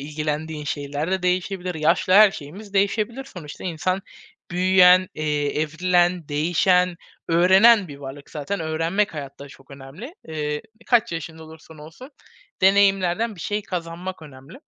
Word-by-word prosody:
ilgilendiğin 150 +1 -4
şeyler 145 +2 -4
de 190 -1 -1
değişebilir. 180 0 -1
Yaşla 165 +4 +2
her 210 0 +8
şeyimiz 195 +6 -11
değişebilir. 215 +6 0
Sonuçta 165 - -10
insan 185 +2 -2 0.5
büyüyen, 185 0 +5
eee, 150 -1 -1
evrilen, 175 +1 +1
değişen, 175 +4 +2 0.3
öğrenen 190 +4 +5
bir 145 - -9
varlık. 140 0 -10
Zaten 160 +6 -4
öğrenmek 165 +5 -1
hayatta 140 -1 -8
çok 135 0 -18
önemli. 140 - -11
Iıı, 150 -1 -3 0.3
kaç 235 -7 +2
yaşında 160 0 -7
olursan 160 0 -15
olsu 160 - -12 0.5
deneyimlerden 195 +2 +3
bir 175 - -12
şey 210 +4 -3
kazanmak 180 0 -6
önemli. 145 - -13
170 Hz, 130 wpm, -22 LUFS, 150-190 Hz, 0.5 s, her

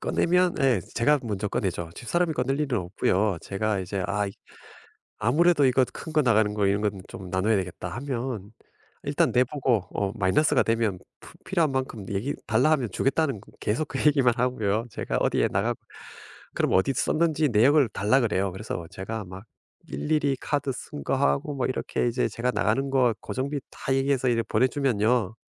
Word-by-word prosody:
꺼내면 180 0 +2
예 130 -7 +3
제가 145 +5 +3
먼저 105 -2 -3
꺼내죠. 85 -4 -2
집사람이 175 +6 0
꺼낼 135 +2 0
일은 135 -6 0
없고요. 95 +1 0
제가 100 0 -2
이제 95 +1 -3
'아이 100 0 -1 0.9
아무래도 150 +7 +3
이것 130 -1 +3
큰 160 - -8
거 155 -1 +3
나가는 110 -4 +3
거 105 -1 +1
이런 100 +1 +1
건 100 -2 -1
좀 95 -2 -9
나눠야 100 +4 +2
되겠다.' 90 -2 -4
하면 120 -6 -4 0.5
일단 145 -1 +1
내 125 +2 +4
보고 125 -7 0
어 100 -1 -1
마이너스가 130 +9 +3
되면 115 -4 0 0.2
푸 - - -14
필요한 170 -6 +1
만큼 130 -6 -3
얘기 105 +8 -2
달라 155 - +3
하면 135 -7 +1
주겠다는 135 - 0 0.2
계속 130 +9 -1
그 - - -4
얘기만 135 -5 +4
하고요. 115 -3 0
제가 - - -3
어디에 - - +2
나가고 - - 0 0.8
그럼 - - 0
어디 95 +8 +3
썼는지 155 0 +1
내역을 130 +4 +4
달라 105 +6 +2
그래요. 100 -5 0
그래서 95 -3 -5
제가 105 +3 -5
막 95 +2 -10 0.4
일일이 150 -3 0
카드 145 -2 -1
쓴 75 - -8
거 - - 0
하고 70 - +1
막 130 - 0
이렇게 130 - -1
이제 125 +2 0
제가 125 +2 -2
나가는 135 +6 0
거 125 -4 +3
고정비 140 +3 -3
다 135 - -4
얘기해서 135 -1 +1
이렇게 115 -1 +1
보내 125 +4 +3
주면요. 120 -5 +1
120 Hz, 365 characters per minute, -26 LUFS, 105-140 Hz, 0.9 s, 내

